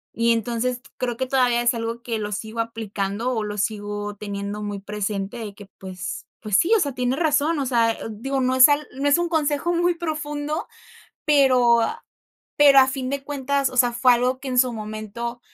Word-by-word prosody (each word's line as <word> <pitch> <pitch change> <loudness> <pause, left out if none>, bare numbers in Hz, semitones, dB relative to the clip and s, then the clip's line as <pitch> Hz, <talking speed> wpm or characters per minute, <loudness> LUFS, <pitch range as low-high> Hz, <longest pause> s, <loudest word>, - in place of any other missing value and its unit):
y, 230 0 +2
entonces, 240 +2 -2 0.2
creo 240 -2 -2
que 260 - -1
todavía 250 -2 +2
es 240 +1 +3
algo 230 0 -4
que 230 -2 -3
lo 210 0 -4
sigo 220 +3 -5
aplicando 220 0 -3
o 220 -3 -1
lo 210 0 -5
sigo 205 0 -3
teniendo 200 0 -5
muy 205 -1 -4
presente 205 +1 -4
de 210 -3 -7
que, 205 - -12
pues 185 -1 -7
pues, 210 -3 +1
sí, 360 - +2
o - - 0
sea, 285 -4 -1
tiene 250 0 -1
razón, 310 0 +1
o 275 - -1
sea, 230 -3 +2
eh, - - -12
digo, 265 +5 -3
no 255 0 +1
es 260 +2 +8
al 290 +1 +1
no 280 +2 0
es 285 - +5
un 345 0 0
consejo 315 +1 0
muy 345 +1 +2
profundo, 305 -2 -3 0.6
pero 255 -5 +5 0.8
pero, 280 -2 +8
a - - +8
a 260 - -1
fin 260 -1 -3
de 280 0 -3
cuentas, 280 -1 -1
o 255 - -7
sea, 245 -1 +4
fue 245 +1 +4
algo 250 +2 0
que, 270 - -5
en 250 - -2
su 250 -2 +3
momento, 215 +2 -6
245 Hz, 210 wpm, -23 LUFS, 215-275 Hz, 0.8 s, es